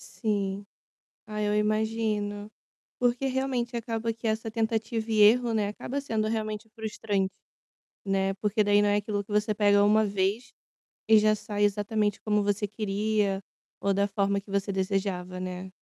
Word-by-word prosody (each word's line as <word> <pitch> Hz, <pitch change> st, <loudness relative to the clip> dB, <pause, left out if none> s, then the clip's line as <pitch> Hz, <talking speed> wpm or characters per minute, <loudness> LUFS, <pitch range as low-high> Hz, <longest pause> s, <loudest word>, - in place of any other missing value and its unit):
Sim. 200 Hz, -3 st, -3 dB, 0.6 s
Ai, 210 Hz, 0 st, -2 dB
eu 210 Hz, -, +1 dB
imagino, 210 Hz, -1 st, 0 dB, 0.5 s
porque, 245 Hz, +2 st, +1 dB
realmente, 255 Hz, -2 st, -1 dB
acaba 230 Hz, 0 st, -2 dB
que 230 Hz, +1 st, -5 dB
essa 220 Hz, 0 st, -1 dB
tentativa 225 Hz, 0 st, -1 dB
e 215 Hz, -1 st, +3 dB
erro, 235 Hz, +3 st, +5 dB
né, 215 Hz, -2 st, +1 dB
acaba 270 Hz, +6 st, -4 dB
sendo 220 Hz, -5 st, -1 dB
realmente 215 Hz, 0 st, -3 dB
frustrante, 215 Hz, -3 st, -2 dB, 0.7 s
né, 195 Hz, -1 st, 0 dB
porque 210 Hz, +2 st, +1 dB
daí 205 Hz, 0 st, +4 dB
não 205 Hz, -, +3 dB
é 205 Hz, -, +3 dB
aquilo 205 Hz, 0 st, -1 dB
que 205 Hz, -, -18 dB
você 210 Hz, +1 st, +1 dB
pega 205 Hz, -1 st, +4 dB
1 215 Hz, +1 st, +4 dB
vez 200 Hz, +4 st, -1 dB, 0.6 s
e 220 Hz, -1 st, +8 dB
já 215 Hz, 0 st, +4 dB
sai 205 Hz, -1 st, -2 dB
exatamente 205 Hz, 0 st, 0 dB
como 210 Hz, -1 st, +1 dB
você 205 Hz, +1 st, 0 dB
queria 205 Hz, -1 st, 0 dB, 0.4 s
ou 200 Hz, -, +1 dB
da 200 Hz, +1 st, +2 dB
forma 200 Hz, 0 st, 0 dB
que 195 Hz, -, -16 dB
você 200 Hz, 0 st, -1 dB
desejava, 190 Hz, -1 st, -2 dB
né. 185 Hz, 0 st, -5 dB
210 Hz, 160 wpm, -28 LUFS, 200-220 Hz, 0.7 s, e